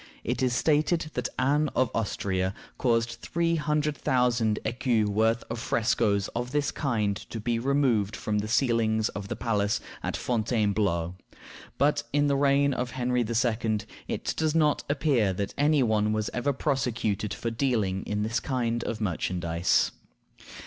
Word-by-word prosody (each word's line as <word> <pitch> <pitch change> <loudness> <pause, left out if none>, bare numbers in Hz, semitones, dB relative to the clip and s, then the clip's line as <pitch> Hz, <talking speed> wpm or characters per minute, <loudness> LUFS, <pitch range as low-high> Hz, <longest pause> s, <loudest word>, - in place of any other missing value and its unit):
It - - -2
is 125 -1 +1
stated 155 +3 +1
that 125 0 -2
Anne 145 +3 +2
of 130 -1 +2
Austria 95 -4 -1 0.2
caused 115 -1 +1
three 170 0 0
hundred 150 0 0
thousand 120 -5 +1
écus 115 -1 +1
worth 110 +3 +1
of 115 0 -4
frescoes 110 -3 +1
of 120 +1 -3
this 145 +1 0
kind 110 -8 0
to 115 - -5
be 115 +1 -1
removed 125 -6 +1
from 105 -1 -1
the 105 - -3
ceilings 110 -2 +2
of 100 -1 -6
the - - -3
palace 105 -3 0 0.2
at - - -2
Fontainebleau. 105 -7 0 0.6
But 145 +1 +3
in 145 0 +2
the 140 -1 +2
reign 140 0 +3
of 125 -1 -2
Henry 125 0 +1
II. 115 -1 0 0.3
it - - -2
does 155 0 0
not 150 -2 +3
appear 135 -9 +2
that 100 +2 -3
any 145 0 +3
one 110 -2 +2
was 110 -1 -1
ever 125 +4 0
prosecuted 115 -7 -1
for 115 - -3
dealing 110 -6 0
in 105 0 -1
this 115 +2 0
kind 120 -3 -1
of 110 -1 -4
merchandise. 85 -3 +1
115 Hz, 155 wpm, -27 LUFS, 105-135 Hz, 0.6 s, But